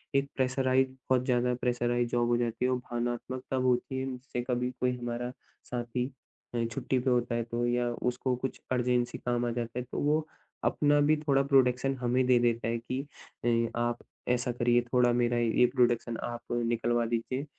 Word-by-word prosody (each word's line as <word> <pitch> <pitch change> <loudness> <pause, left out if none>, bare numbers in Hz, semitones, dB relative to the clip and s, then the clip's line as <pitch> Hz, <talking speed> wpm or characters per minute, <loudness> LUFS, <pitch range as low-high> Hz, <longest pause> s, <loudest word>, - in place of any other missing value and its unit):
एक 140 0 +3
प्रेशराइज़्ड 130 0 +2 0.2
बहुत 130 -1 +3
ज़्यादा 125 -1 +2
प्रेशराइज़्ड 120 -1 0
जॉब 120 -1 +2
हो 120 - +3
जाती 120 0 -1
है। 130 - +2
वो 130 - +2
भावनात्मकता 120 +2 -4
होती 125 +1 +1
है 130 - -2
जिससे 125 -1 -5
कभी 125 0 0
कोई 125 0 +2
हमारा 120 0 -3 0.4
साथी 120 0 -2 0.5
अ, 120 - +1
छुट्टी 130 +3 -1
पे 130 +2 0
होता 120 -1 +1
है 120 - 0
तो 120 +1 -2
या 120 0 +1 0.2
उसको 125 +1 -1
कुछ 130 +2 -4
अर्जेन्सी 125 -1 +1
काम 120 0 -1
आ 120 - 0
जाता 120 +1 -3
है - - -3
तो - - -2
वो 155 +2 +1 0.4
अपना 145 0 +3
भी 155 - +5
थोड़ा 145 -2 +2
प्रोडक्शन 135 -1 +3
हमें 125 +1 +1
दे 125 -1 +6
देता 120 -1 +1
है 115 +1 0
कि 130 +3 -3 0.4
अ, 115 -1 +2
आप 120 0 0 0.3
ऐसा 125 0 +1
करिए 120 0 +3
थोड़ा 125 -1 +5
मेरा 120 0 +2
ये 120 +1 +4
प्रोडक्शन 120 -2 +2
आप 120 0 -4
निकलवा 120 0 +1
दीजिए। 120 +4 -2
120 Hz, 185 wpm, -30 LUFS, 120-130 Hz, 0.5 s, दे